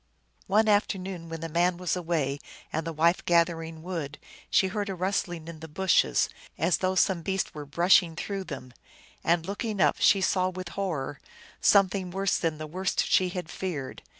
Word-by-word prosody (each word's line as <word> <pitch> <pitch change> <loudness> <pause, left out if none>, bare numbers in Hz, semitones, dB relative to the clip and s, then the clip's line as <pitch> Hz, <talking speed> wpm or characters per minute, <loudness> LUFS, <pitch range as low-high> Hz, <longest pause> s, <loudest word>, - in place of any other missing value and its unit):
One 215 +3 +3
afternoon, 190 -4 0
when 165 -1 -6
the 165 - -3
man 175 +2 +1
was 180 -2 -1
away 160 -6 -1 0.3
and 160 +1 -2
the - - -2
wife 165 +3 +2
gathering 165 -2 +1
wood, 165 -6 -4 0.3
she 190 - +3
heard 205 +1 -3
a 195 - -3
rustling 175 -3 -2
in 165 -2 -8
the 160 - -8
bushes, 160 - +2 0.3
as 170 +1 +2
though 185 0 0
some 185 -2 +2
beast 190 +2 -2
were 150 -1 -7
brushing 170 +2 +4
through 195 +2 -4
them, 130 -6 -8 0.5
and, 165 0 +2
looking 205 +2 -3
up, - - +4
she 200 +2 +5
saw 185 -1 +2
with 185 -1 -6
horror 160 -7 -3 0.4
something 195 -2 +4
worse 195 +2 0
than 160 -2 -1
the 155 - -5
worst 185 +5 -1
she 185 -1 +3
had 180 -2 -5
feared. 150 -9 -5
175 Hz, 180 wpm, -27 LUFS, 160-190 Hz, 0.5 s, she